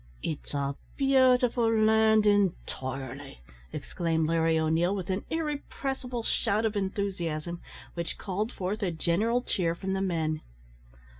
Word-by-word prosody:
"It's 150 -1 -4
a 140 0 -1 0.2
beautiful 255 -4 +4
land, 220 -1 +4
intirely," 140 - -1 0.3
exclaimed 165 -2 -1
Larry 165 0 +2
O'Neil, 160 +4 +2
with 190 -1 -3
an 190 +2 -1
irrepressible 275 -5 -3
shout 220 -1 +1
of 220 -1 0
enthusiasm, 175 -4 -2 0.3
which 170 -1 -3
called 210 +4 -2
forth 195 +4 -3
a 195 - +1
general 195 +9 +1
cheer 170 -7 0
from 190 +2 -3
the 195 - 0
men. 160 -4 0
190 Hz, 125 wpm, -29 LUFS, 165-220 Hz, 0.3 s, beautiful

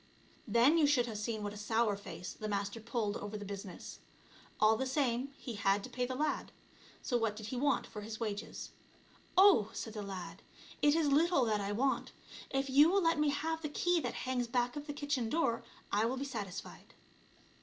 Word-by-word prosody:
Then 260 +8 +5
you 300 - +5
should 270 -4 +3
have 220 -3 -5
seen 215 0 -3
what 205 0 -3
a - - -9
sour 220 0 +1
face 180 -3 -7
the 215 - -6
Master 200 +1 -2
pulled 225 -2 -2
over 205 +1 -5
the 205 - -7
business! 200 -2 -7 0.6
All 215 +1 +6
the 265 +4 -1
same, 260 -1 0
he 245 - -6
had 200 -1 +1
to - - -8
pay 250 -1 -1
the 255 - -3
lad; 300 +3 -1 0.5
so 245 - +1
what 225 -2 0
did 215 0 -7
he 255 - -4
want 275 0 +1
for 210 - -8
his 220 +1 -6
wages? 215 -2 -4 0.3
" - - -29
Oh 375 - +7
!" - - -19
said 220 - -5
the 215 - -4
lad, 185 -3 -7 0.2
" - - -19
it 295 +1 +5
is 325 -1 +2
little 300 -1 +4
that 215 -2 +1
I 200 0 -2
want. 260 +6 0 0.4
If 270 0 0
you 285 +4 +6
will 390 +1 +3
let 330 -1 +3
me 300 -1 +3
have 320 +3 -1
the 300 - -3
key 350 +3 +2
that - - -3
hangs 250 -2 0
back 245 +1 0
of 295 +1 -6
the 290 - -3
kitchen 285 -5 -1
door 300 -7 +1 0.3
I 210 +2 +3
will 250 +3 -1
be 275 - -3
satisfied." 205 -8 -7
235 Hz, 220 wpm, -34 LUFS, 210-285 Hz, 0.6 s, Oh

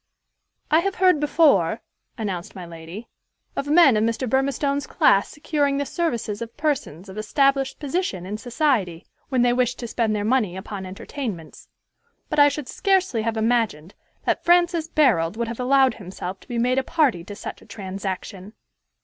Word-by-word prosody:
"I 315 - +6
have 390 +3 -1
heard 365 -4 +4
before," 295 +1 +3 0.4
announced 190 -6 -4
my 185 -2 -7
lady, 170 +6 -9 0.5
"of 280 - -3
men 300 -4 +6
of 215 - +2
Mr. 230 +3 -1
Burmistone's 275 +2 0
class 195 - +3
securing 290 -2 -1
the 285 - -1
services 235 - -2
of 230 0 -7
persons 275 - -2
of 195 +2 -7
established 275 +4 +1
position 285 - -2
in 210 +3 -5
society 225 - 0 0.2
when 255 -3 +2
they 245 0 +3
wished 250 0 +1
to 235 - -6
spend 225 -1 0
their 205 0 -2
money 215 -6 +1
upon 190 0 -6
entertainments; 195 - -7 0.6
but 305 - +1
I 290 0 +8
should 285 -2 -5
scarcely 380 - +1
have 225 0 -2
imagined 220 -8 0 0.3
that - - 0
Francis 345 -2 +3
Barold 220 - +2
would 235 0 -1
have 230 - -6
allowed 265 +1 +4
himself 190 -1 -7
to - - -20
be 240 -3 -4
made 250 +3 +2
a - - -2
party 265 - +1
to 205 - -8
such - - -8
a - - -18
transaction." 195 0 -6
240 Hz, 170 wpm, -23 LUFS, 200-285 Hz, 0.6 s, I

